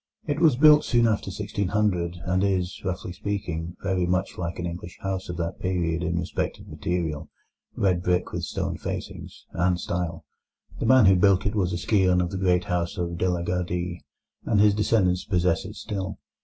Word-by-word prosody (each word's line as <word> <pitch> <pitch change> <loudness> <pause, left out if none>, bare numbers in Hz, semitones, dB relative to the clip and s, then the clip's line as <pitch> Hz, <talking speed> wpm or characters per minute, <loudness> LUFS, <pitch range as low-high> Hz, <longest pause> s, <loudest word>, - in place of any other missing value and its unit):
It 145 -1 -1
was 160 -6 +5
built 150 +2 +7
soon 120 -2 +3
after 110 -3 +1
1600, 95 -2 -1
and 90 +1 +1
is, 95 -2 -1
roughly 90 -1 -3
speaking, 90 -5 -4
very 90 -1 0
much 90 +2 0
like 85 -1 -4
an 85 - -3
English 85 0 -6
house 95 -1 -3
of 85 - -4
that 85 -1 -3
period 85 -3 -1
in 85 -1 -1
respect 85 - -2
of - - -14
material—red 85 +2 -3
brick 90 0 0
with - - -3
stone - - -3
facings—and 90 +1 -3
style. 85 -2 -3 0.5
The - - -1
man 130 -2 +7
who 95 0 +7
built 95 0 +4
it 100 - 0
was 95 -5 0
a 85 - -1
scion 90 -1 +3
of 90 -1 0
the 95 - -3
great 90 -1 +2
house 85 -1 -2
of 85 -1 -3
De 90 - +2
la 90 -1 -1
Gardie, 90 0 -2 0.4
and 105 - +1
his 105 0 +6
descendants 95 -4 +2
possess 90 -3 +1
it 105 +2 -8
still. 100 -2 -4
90 Hz, 185 wpm, -25 LUFS, 85-100 Hz, 0.5 s, built